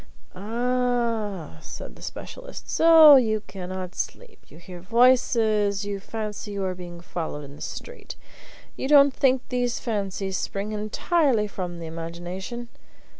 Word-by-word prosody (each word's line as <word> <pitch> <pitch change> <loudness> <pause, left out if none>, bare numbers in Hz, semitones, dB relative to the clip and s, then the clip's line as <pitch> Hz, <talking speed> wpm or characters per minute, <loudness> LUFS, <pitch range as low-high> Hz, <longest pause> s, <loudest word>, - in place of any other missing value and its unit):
"Ah!" 230 - -1
said - - -9
the - - -16
specialist; - - -8
"so 320 -3 +8
you 220 -4 +1
cannot 185 -1 -6
sleep; 485 -3 -6
you 155 - -15
hear 175 +1 -10
voices; 220 -2 +3
you 200 -1 -3
fancy 210 0 -5
you 200 -1 -2
are 185 - -1
being 175 -1 -9
followed 160 -4 -5
in 140 0 -11
the - - -14
street. 485 +1 -7 0.6
You - - -3
don't 280 -1 +6
think 260 -1 +2
these 245 -1 -1
fancies 195 -4 -2
spring 200 +2 -3
entirely 220 +4 +1
from 180 -4 -5
the 170 - -7
imagination? 175 +8 -6
210 Hz, 135 wpm, -25 LUFS, 185-250 Hz, 0.6 s, so